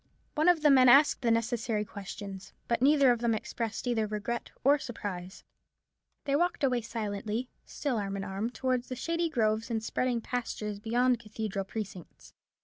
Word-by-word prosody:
One 315 +3 +3
of 335 -3 +3
the 295 - +7
men 255 -2 +7
asked 280 +4 +6
the 240 - +1
necessary 230 -2 0
questions. 195 -1 -8
But 235 0 0
neither 280 -1 +6
of 240 - +1
them 235 -1 +1
expressed 225 +1 -4
either 225 -3 +1
regret 215 +3 -3
or 285 +2 +5
surprise. 190 -7 -6 0.8
They 280 -1 +1
walked 345 0 +1
away 250 -3 +2
silently, 220 +1 -4
still 275 -5 -2
arm 200 -1 -2
in 195 - -4
arm, 195 +4 -3
towards 250 +1 -1
the 255 - -3
shady 335 +5 -1
groves 220 -4 0
and 225 -2 -1
spreading 245 +1 0
pastures 220 -4 -4
beyond 245 +4 +2
the - - -1
cathedral 215 -3 -4
precincts. 195 -4 -8
230 Hz, 170 wpm, -30 LUFS, 210-255 Hz, 0.8 s, the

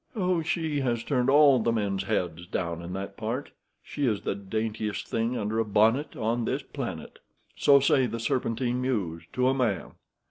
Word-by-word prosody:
"Oh, 180 -4 +1
she 160 -2 -1
has 120 -4 -1
turned 130 -3 +1
all 140 -2 +6
the 115 +1 +1
men's 100 -4 -1
heads 85 0 -2
down 85 -2 -3
in 85 +1 -7
that 100 +1 -5
part. 115 +6 -3 0.3
She 145 -2 -2
is 105 -3 0
the - - -1
daintiest 105 +1 -3
thing 115 +2 -1
under 110 +2 -1
a - - +3
bonnet 110 +7 +2
on 115 +1 -1
this - - -2
planet. - - -6 0.4
So 140 -1 +6
say 135 -1 +3
the 115 - -4
Serpentine 120 +1 -1
Mews, 100 -11 -2
to 125 0 +2
a 130 - +4
man. 120 -9 -1
115 Hz, 180 wpm, -27 LUFS, 105-130 Hz, 0.4 s, all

